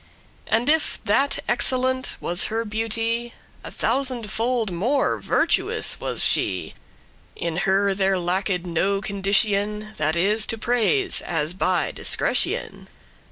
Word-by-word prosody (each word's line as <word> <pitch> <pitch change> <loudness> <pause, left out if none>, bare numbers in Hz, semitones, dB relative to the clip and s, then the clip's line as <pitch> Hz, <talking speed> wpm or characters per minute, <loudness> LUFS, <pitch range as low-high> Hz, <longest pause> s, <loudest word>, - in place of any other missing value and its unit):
*beams, - - -15
rays 220 - +5
And 245 - -3
if 320 0 0
that 265 +6 +1
excellent 255 +1 +1
was 175 0 0
her 225 +1 -2
beauty, 225 +2 -1 0.3
A - - -7
thousand 255 -6 0
fold 230 -2 -1
more 240 +11 0
virtuous - - +1
was - - +1
she. - - 0 0.6
In 170 -1 -4
her 195 +1 +2
there 190 0 +1
lacked 180 0 -1
no 190 +4 0
condition, 205 +1 0
That 155 +1 0
is 210 +5 +2
to 225 - -2
praise, 245 - +1
as 160 -1 -2
by 185 -1 +1
discretion. - - 0
210 Hz, 130 wpm, -23 LUFS, 190-240 Hz, 0.6 s, rays